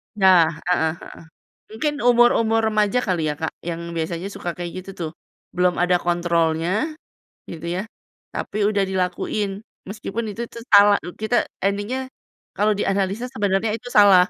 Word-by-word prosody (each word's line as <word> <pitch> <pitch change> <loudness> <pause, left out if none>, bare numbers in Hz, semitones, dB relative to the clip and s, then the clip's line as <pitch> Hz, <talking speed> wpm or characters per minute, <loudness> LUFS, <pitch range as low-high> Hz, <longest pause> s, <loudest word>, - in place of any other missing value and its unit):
Nah, 185 -5 +6 0.2
heeh 160 -3 +2
heeh. - - -11 0.4
Mungkin 230 +8 -2
umur-umur 235 -2 +4
remaja 215 +2 +2
kali 175 -6 0
ya 150 - -1
Kak, 160 +2 -3
yang 170 0 -5
biasanya 170 +3 -3
suka 175 -4 -5
kayak 175 -1 -5
gitu 185 - -11
tuh, 160 -3 -4 0.4
belum 180 0 +2
ada 180 0 +3
kontrolnya 175 - 0 0.6
gitu 165 0 -8
ya, 185 - -1 0.5
tapi 210 - -2
udah 200 -2 +1
dilakuin. 190 +2 -1 0.4
Meskipun 215 +2 -4
itu 230 +3 -5
tuh 230 - -8
salah, 205 0 +8 0.3
kita 220 +3 +2 0.2
ending-nya 205 +6 -1 0.6
kalau 210 +1 +3
dianalisa 195 +3 0
sebenarnya 205 -1 +1
itu 245 +2 -13
salah. 200 -4 +7
195 Hz, 145 wpm, -22 LUFS, 175-215 Hz, 0.6 s, salah